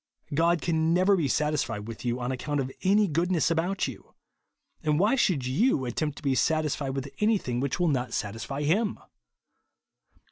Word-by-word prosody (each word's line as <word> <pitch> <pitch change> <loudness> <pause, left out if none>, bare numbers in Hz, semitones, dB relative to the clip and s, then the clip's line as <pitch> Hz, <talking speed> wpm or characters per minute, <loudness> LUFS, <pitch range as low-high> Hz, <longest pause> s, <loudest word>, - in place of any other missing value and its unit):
God 165 +2 +2
can 160 0 +1
never 185 +2 +4
be 165 -6 0
satisfied 135 -7 -1
with 115 -1 -8
you 120 0 -1
on 125 +1 -2
account 145 +3 -2
of 135 -1 -2
any 205 +2 +3
goodness 170 +1 +1
about 175 +3 0
you; 130 -6 -10 0.7
and 150 -1 +1
why 205 +6 +3
should 180 - +1
you 135 - +2
attempt 145 +4 -2
to - - -11
be 135 -2 +2
satisfied 150 -2 0
with 135 0 -5
anything 205 - +1
which 140 +5 -2
will 175 - +2
not 130 -5 0
satie; 105 +2 -4
fy 140 +1 -4
him 200 +8 +1
150 Hz, 175 wpm, -27 LUFS, 130-175 Hz, 0.7 s, never